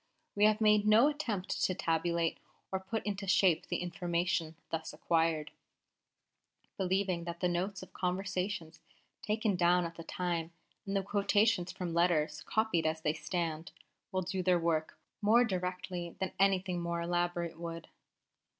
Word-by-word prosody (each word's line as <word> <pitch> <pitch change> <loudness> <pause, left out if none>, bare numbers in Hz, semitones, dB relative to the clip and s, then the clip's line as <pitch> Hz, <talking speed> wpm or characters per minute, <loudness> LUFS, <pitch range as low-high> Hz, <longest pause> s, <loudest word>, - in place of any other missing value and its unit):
We 205 0 +4
have 215 0 +4
made 210 -1 +4
no 225 +7 +7
attempt 230 -11 -3
to 185 - +2
tabulate 165 0 0 0.3
or 190 - 0
put 215 +4 -4
into 200 -1 -3
shape 185 -4 +3
the - - -2
information 175 -2 -1 0.2
thus 160 -1 -3
acquired, 160 -2 +1 1.2
believing 190 -2 0
that 170 0 -5
the 180 - +2
notes 185 +3 -2
of - - -14
conversations 185 -2 -2 0.4
taken 215 -1 0
down 175 0 +3
at 165 0 -7
the 165 - -7
time, 170 -1 -2 0.3
and 195 - -2
the 195 - +1
quotations 205 -1 +2
from 175 -2 -4
letters 165 -3 +2
copied 195 -7 +1
as 160 0 -1
they 150 -1 +1
stand, 165 0 -3 0.4
will 185 -1 0
do 185 +1 -2
their 180 0 +3
work 160 -2 0 0.2
more 225 +4 +5
directly 180 -3 -3
than 190 -1 -2
anything 190 -2 +2
more 170 0 -2
elaborate 175 -1 -1
would. 165 -1 -6
180 Hz, 150 wpm, -32 LUFS, 170-195 Hz, 1.2 s, no